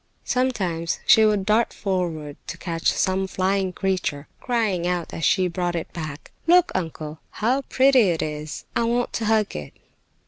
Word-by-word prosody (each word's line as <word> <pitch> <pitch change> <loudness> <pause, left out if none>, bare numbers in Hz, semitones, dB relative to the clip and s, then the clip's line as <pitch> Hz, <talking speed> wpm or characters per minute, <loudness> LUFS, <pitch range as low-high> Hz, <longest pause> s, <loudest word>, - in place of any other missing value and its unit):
Sometimes 185 -10 -1
she 220 - +7
would 210 -3 +2
dart 215 +3 +3
forward 170 -7 -2
to 170 - -5
catch 170 -1 0
some 190 0 0
flying 190 0 0
creature, 180 -7 -2
crying 215 -8 0
out 175 -2 -2
as 165 - -5
she 190 0 +3
brought 175 0 -2
it 165 - -4
back: 155 -3 -7 0.2
"Look, 355 +1 +5
uncle, 160 -3 -4
how 250 +6 0
pretty 260 -6 +4
it 165 -2 0
is! 150 -1 -5
I 235 - +2
want 240 +1 0
to 225 - -2
hug 215 -1 +1
it!" 75 -1 -6
185 Hz, 165 wpm, -23 LUFS, 165-220 Hz, 0.2 s, she